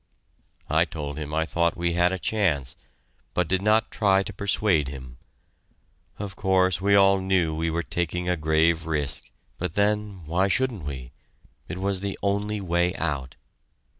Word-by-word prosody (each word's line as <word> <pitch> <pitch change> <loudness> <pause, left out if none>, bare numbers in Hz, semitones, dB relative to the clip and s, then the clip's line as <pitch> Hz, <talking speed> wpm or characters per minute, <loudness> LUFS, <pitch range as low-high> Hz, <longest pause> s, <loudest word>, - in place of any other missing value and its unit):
I 80 +2 +3
told 75 -3 -6
him 75 -1 -5
I 80 +1 +1
thought 85 +1 0
we 85 0 0
had 90 +1 +3
a 95 - -1
chance, 85 - 0 0.6
but 90 -2 +1
did 95 +1 +1
not 110 +2 +2
try 95 -2 +3
to - - -7
persuade 100 -7 +1
him. 65 -3 -9 1.0
Of 100 -2 -6
course, 95 -3 +2
we 100 +1 +4
all 100 -1 +5
knew 95 -4 +1
we 80 +1 -1
were 85 +1 -1
taking 90 +1 -2
a 90 - +2
grave 80 +1 +2
risk, 70 -5 -2 0.3
but 90 -2 -3
then, 105 -3 0
why 90 +5 +1
shouldn't 110 - 0
we? 65 -4 -6 0.6
It - - -5
was 95 0 -1
the 100 -1 -3
only 100 +1 0
way 90 -1 0
out. 65 -3 -3
90 Hz, 165 wpm, -25 LUFS, 80-100 Hz, 1.0 s, all